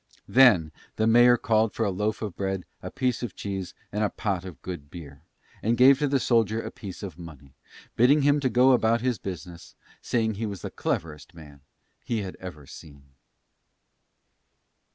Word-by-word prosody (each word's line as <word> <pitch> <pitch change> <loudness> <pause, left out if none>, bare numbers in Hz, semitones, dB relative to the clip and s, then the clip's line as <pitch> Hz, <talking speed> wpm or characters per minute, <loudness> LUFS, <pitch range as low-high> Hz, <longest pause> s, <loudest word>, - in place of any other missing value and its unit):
Then 105 -12 +5 0.2
the 110 - 0
mayor 120 +2 +6
called 110 -3 +1
for 115 - 0
a 100 - 0
loaf 105 +4 -2
of 105 -5 -5
bread, 95 -2 -3 0.2
a - - -6
piece 125 -2 -1
of 120 -6 -5
cheese, 95 -3 -5 0.2
and 105 +1 -1
a 105 - +1
pot 95 -4 -3
of 85 -8 -10
good 85 -6 -7
beer, 70 -4 -11 0.4
and 115 +2 0
gave 130 +2 +6
to 150 - +1
the 135 0 +1
soldier 115 -3 +1
a - - -6
piece 100 0 -9
of 90 -4 -8
money, 70 -6 -12 0.4
bidding 140 +5 +4
him 145 +1 +3
to 135 -2 0
go 125 +2 +4
about 115 -2 +2
his 125 -4 -1
business, 90 -3 -8 0.3
saying 110 -2 0
he 110 +2 -4
was 100 -4 -7
the - - -5
cleverest 75 +1 -4
man 75 -4 -14 0.4
he 110 -3 -2
had 95 - -7
ever 90 -6 -9
seen. 70 -1 -14
105 Hz, 180 wpm, -26 LUFS, 85-120 Hz, 0.4 s, mayor